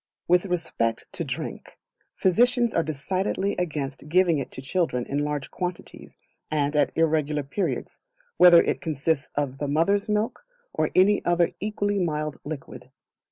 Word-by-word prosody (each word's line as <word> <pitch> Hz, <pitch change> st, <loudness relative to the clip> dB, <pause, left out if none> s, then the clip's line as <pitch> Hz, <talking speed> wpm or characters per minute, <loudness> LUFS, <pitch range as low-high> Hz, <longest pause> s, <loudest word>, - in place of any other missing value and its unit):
With 180 Hz, +2 st, +3 dB
respect 165 Hz, -10 st, -1 dB
to -, -, -3 dB
Drink, -, -, -6 dB, 0.4 s
physicians 240 Hz, +5 st, +3 dB
are -, -, +3 dB
decidedly 185 Hz, +6 st, -2 dB
against 150 Hz, -4 st, -4 dB
giving 175 Hz, -2 st, +3 dB
it 135 Hz, -, -4 dB
to -, -, -6 dB
children 135 Hz, -3 st, -1 dB
in 140 Hz, -, -2 dB
large 145 Hz, -2 st, -3 dB
quantities, 180 Hz, -1 st, -6 dB, 0.3 s
and 145 Hz, -1 st, 0 dB
at 150 Hz, -, +3 dB
irregular 155 Hz, -2 st, +1 dB
periods, 140 Hz, +9 st, -3 dB, 0.4 s
whether 175 Hz, -1 st, +8 dB
it -, -, -1 dB
consists 155 Hz, -1 st, -1 dB
of 135 Hz, -2 st, -2 dB
the 145 Hz, -, -2 dB
mother's 185 Hz, +9 st, +1 dB
milk, 210 Hz, -, -1 dB, 0.3 s
or -, -, 0 dB
any 200 Hz, +3 st, +4 dB
other 175 Hz, -1 st, +2 dB
equally 205 Hz, -1 st, -1 dB
mild 150 Hz, -4 st, -2 dB
liquid. 145 Hz, -2 st, -8 dB
165 Hz, 145 wpm, -25 LUFS, 145-185 Hz, 0.4 s, whether